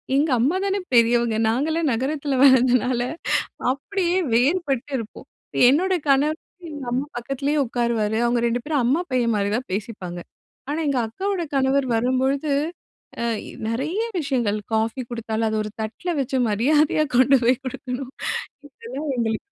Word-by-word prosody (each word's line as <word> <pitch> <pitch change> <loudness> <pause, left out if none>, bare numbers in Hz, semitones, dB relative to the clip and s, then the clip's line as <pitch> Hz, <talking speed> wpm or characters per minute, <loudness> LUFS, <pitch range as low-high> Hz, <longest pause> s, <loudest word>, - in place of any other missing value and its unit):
எங்க 290 +3 +3
அம்மா 275 +10 +2
தானே 395 0 0
பெரியவங்க, 235 -1 +4
நாங்கலாம் 310 +7 +1
நகரத்துல 275 +3 -1
வளந்ததுனால 250 -2 +4 0.7
அப்டீயே 355 +6 -1 0.2
வேறுபட்டு 275 +1 +1
இருப்போம். 225 -2 -8 0.4
என்னோட 365 +8 +3
கணவர் 290 +3 +3 0.3
எங்க 290 -3 -7
அம்மா 265 +4 0
பக்கத்துலேயே 275 +4 -1
உட்காருவாரு. 230 -3 0
அவங்க 240 0 +1
ரெண்டு 235 +1 0
பேரும், 295 -3 0
அம்மா, 270 +8 +2
பையன் 240 -2 +1
மாரி 200 -1 0
தான் 255 - -5
பேசிப்பாங்க. 190 -4 -5 0.5
ஆனா, 295 - -2
எங்க 275 -3 +1
அக்காவோட 380 - -2
கணவர் 265 0 +2
வரும்பொழுது 265 +5 +1 0.7
அ - - 0 0.2
எ - - -9
நெறைய 280 - -1 0.2
விஷயங்கள் 245 -8 0
காஃபி 225 +3 0
குடுத்தாலும் 225 -1 -2
அத 220 - -1
ஒரு 215 - -6
தட்டில 225 +12 -4
வச்சு, 265 0 -1
மரியாதையா 295 +8 +3
கொண்டு 270 +2 +6
போய் 250 +2 +4
குடுக்கணும். 255 0 -5 0.6
இதெல்லாம் 270 +3 -7
எங்களுக்கு 225 -2 0
260 Hz, 140 wpm, -23 LUFS, 235-290 Hz, 0.7 s, கொண்டு